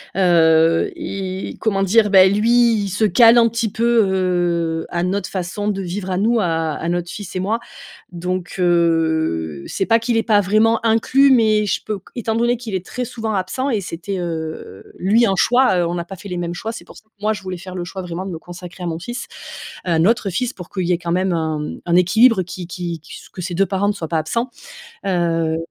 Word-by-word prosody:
heu 165 -3 +4
et 190 -1 -5
comment 195 -3 0
dire? 210 +2 +3
Beh, 190 -1 +7
lui 230 +3 +3
il 200 - -3
se 205 +4 +1
cale 230 +2 +6
un 230 -1 +6
petit 230 -2 -2
peu, 235 0 +3
heu, 175 -4 0
à 175 -1 -2
notre 190 +1 -1
façon 190 +2 -4
de 200 -2 -1
vivre 190 +1 -5
à 180 - 0
nous, 225 +4 +2
à 165 -5 0
à 165 - -4
notre 175 0 -2
fils 195 -3 -8
et - - -1
moi. 215 +5 -1 0.5
Donc, 180 +1 -4
heu, 160 - +1
c'est 195 - -2
pas 230 0 +4
qu'il 230 +1 -1
est 225 - +4
pas 210 -3 +3
vraiment 215 +3 +2
inclus 255 +5 +4
mais 215 -4 +4
je - - 0
peux 210 -2 -3
q 190 - -21
étant 225 -2 -2
donné 240 +1 +2
qu'il 225 -4 -7
est 185 -1 -2
très 250 - -4
souvent 225 -2 -4
absent 230 +9 -2
et 220 - 0
c'était, 185 +2 -5
heu 160 - -6
lui 220 +6 +3
un 195 - +1
choix, 245 -2 +3
heu, 175 - +1
on 170 - -2
n'a 170 -1 -3
pas 195 +3 -9
fait 200 - -10
les 180 - -4
mêmes 175 0 -3
choix, 220 +6 -5
c'est - - -9
pour - - -15
ça - - -15
que 220 - -40
moi 215 +1 +2
je 205 - -6
voulais 185 -1 -5
faire 185 +1 -9
le 175 -1 -4
choix 190 +2 -7
vraiment 180 +1 -5
de - - -5
me 165 - -5
consacrer 175 +1 -10
à - - -3
mon 165 -1 -3
fils 240 +8 -6 0.6
à 170 -3 +1
notre 205 +3 +2
fils 240 +8 -2
pour 180 -6 -11
qu'il 185 -2 -2
y 180 - +1
ait 170 - +1
quand 170 -1 -3
même 185 0 +1
un, 160 -2 -1
hem, - - -7
un 170 0 +3
équilibre 215 +4 +5
qui 180 0 -7
qui 170 -1 -5
qui 155 - -15
s - - -15
que - - -10
ses 175 0 -4
2 195 +3 +2
parents 195 +1 0
ne - - +2
soient 170 -6 -6
pas 165 - 0
absents. 230 +11 -2 0.6
Heu, 165 -3 0
185 Hz, 240 wpm, -19 LUFS, 170-220 Hz, 0.6 s, Beh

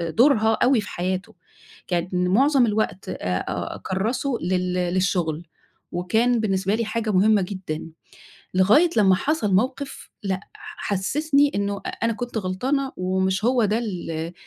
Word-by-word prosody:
دورها 220 - +3
أوي 250 -2 +4
في 205 - -8
حياته، 185 +2 -3 0.5
كان 175 0 -1 0.2
معظَم 265 +5 +4
الوقت 210 -3 -1
آآ، - - -3 0.3
أ - - -3
أكرّسُه 235 +7 -2
لل 180 +1 -1 0.2
للشغل، 175 -4 0 0.5
وكان 225 +7 +1
بالنسبة 195 -2 0
لي 230 +1 0
حاجة 225 0 -2
مهمة 205 +1 +4
جدًا. 180 -4 -5 0.6
لغاية 215 - +5
لمّا 195 -4 +5
حصل 215 -3 0
موقف 260 +7 -1
لأ، 190 -2 -2
ح - - -11 0.2
حسسني 285 +8 +2
إنه 200 0 -2 0.2
أنا 230 0 +2
كنت 240 0 -4
غلطانة 260 +9 -1
ومش 190 +2 0
هو 245 -1 +3
ده 210 +2 +1
ال 170 -7 -4
205 Hz, 135 wpm, -23 LUFS, 185-240 Hz, 0.6 s, لغاية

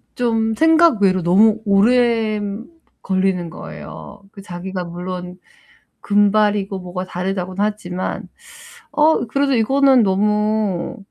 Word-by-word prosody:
좀 225 -2 0
생각 320 -5 +4
외로 185 -2 +2
너무 210 +5 +3
오래 220 +1 +2 0.6
걸리는 185 -2 -1
거예요. 205 +4 -10
그 200 - -12
자기가 180 0 -6
물론 180 +1 -7 0.6
금발이고 205 -1 +1
뭐가 180 0 -6
다르다고는 185 +1 -3
하지만, 185 -4 -4 0.6
'어 305 -3 +2
그래도 275 +4 0
이거는 265 +2 +3
너무 210 -1 0
205 Hz, 240 characters per minute, -19 LUFS, 185-225 Hz, 0.6 s, 생각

